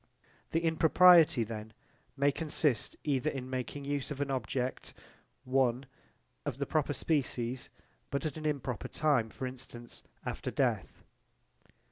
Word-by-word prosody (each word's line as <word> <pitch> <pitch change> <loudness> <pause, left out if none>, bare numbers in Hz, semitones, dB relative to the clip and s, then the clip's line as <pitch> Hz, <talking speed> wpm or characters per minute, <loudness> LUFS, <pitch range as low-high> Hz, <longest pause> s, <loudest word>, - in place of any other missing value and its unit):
The 165 - +1
impropriety 165 -3 +6
then 110 0 -7 0.4
may 140 +1 +4
consist 150 -6 0
either 145 0 +1
in 135 -3 -5
making 130 +2 -4
use 145 -1 -2
of 145 -2 -5
an 140 -1 -1
object 130 0 -2 0.5
Of 130 0 -2
the 140 - -1
proper 150 -1 0
species 130 -4 -1 0.4
but 140 +3 -2
at 150 - -2
an 155 0 -3
improper 135 -5 -2
time: 140 -8 +2
for 130 - -6
instance, 125 -2 -7 0.2
after - - -3
death. - - -1
135 Hz, 125 wpm, -32 LUFS, 125-150 Hz, 0.5 s, impropriety